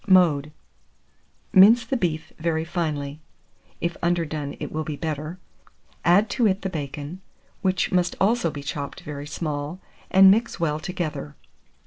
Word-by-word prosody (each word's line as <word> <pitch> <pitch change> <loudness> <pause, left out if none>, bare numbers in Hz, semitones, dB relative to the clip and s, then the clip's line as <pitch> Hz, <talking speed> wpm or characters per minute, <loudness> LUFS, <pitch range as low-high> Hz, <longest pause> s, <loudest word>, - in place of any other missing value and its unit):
Mode. 160 -6 +4 1.0
Mince 220 +4 +7
the 250 - -1
beef 165 -8 -2
very 160 0 0
finely 155 -4 -3 0.6
(if 170 0 -2
underdone 160 -4 -1
it - - -5
will 155 0 -2
be 155 -1 -4
better), 155 +2 -4 0.7
add 195 +6 +5
to 235 0 +3
it 190 0 0
the 190 - -2
bacon, 150 +2 -5 0.4
which 185 -1 +1
must 180 -2 +1
also 215 -2 +2
be 145 -2 -7
chopped 140 -1 -5
very 145 -1 -7
small, 150 +2 -4 0.3
and 190 0 +8
mix 225 +4 +1
well 155 -2 0
together. 155 - -4
165 Hz, 140 wpm, -24 LUFS, 150-185 Hz, 1.0 s, and